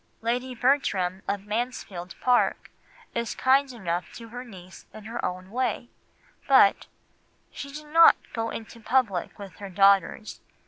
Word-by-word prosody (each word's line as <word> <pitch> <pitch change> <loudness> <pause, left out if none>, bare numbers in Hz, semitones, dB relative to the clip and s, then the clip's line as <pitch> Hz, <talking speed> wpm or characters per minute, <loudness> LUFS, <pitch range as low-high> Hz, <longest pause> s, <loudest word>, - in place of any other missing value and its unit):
Lady 245 +3 -2
Bertram 200 -8 +1
of 200 0 -2
Mansfield 210 -5 -4
Park 250 -1 +1 0.4
is 235 -1 -3
kind 270 +1 +3
enough 180 -7 -4
to 230 -1 -10
her 245 +2 -7
niece 185 -6 -13
in 215 - -10
her 230 +3 -6
own 185 +1 -4
way, 245 0 -2 0.6
but 260 -8 +5 0.6
"she 280 - -8
did 300 +2 -9
not 330 +2 +7 0.2
go 225 0 -2
into 225 +1 -8
public 225 -6 0
with 195 -5 -10
her 200 -1 -8
daughters. 200 +3 +2
225 Hz, 140 wpm, -26 LUFS, 195-255 Hz, 0.6 s, not